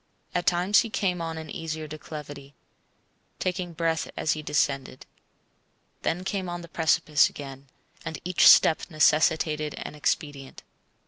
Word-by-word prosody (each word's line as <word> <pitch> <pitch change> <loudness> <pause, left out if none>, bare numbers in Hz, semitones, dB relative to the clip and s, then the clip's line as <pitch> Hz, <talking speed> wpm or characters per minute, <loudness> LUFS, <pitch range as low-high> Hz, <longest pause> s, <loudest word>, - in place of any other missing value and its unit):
At 175 - -2
times 180 +4 +4
he 230 - 0
came 185 -4 -1
on 165 -1 -4
an 160 -1 -8
easier 160 -1 -5
declivity, 145 -2 -9 0.8
taking 180 -1 -3
breath 165 0 -1
as 155 - 0
he 155 - -5
descended; 140 -3 -1 1.0
then 175 +3 -1
came 190 -1 -3
on 175 0 -5
the 170 - -10
precipice 160 -2 +3
again, 135 -1 -10 0.4
and 160 - -5
each 180 0 +4
step 160 - +7
necessitated 155 -1 +2
an - - -6
expedient. 145 -2 -3
160 Hz, 135 wpm, -26 LUFS, 150-175 Hz, 1.0 s, step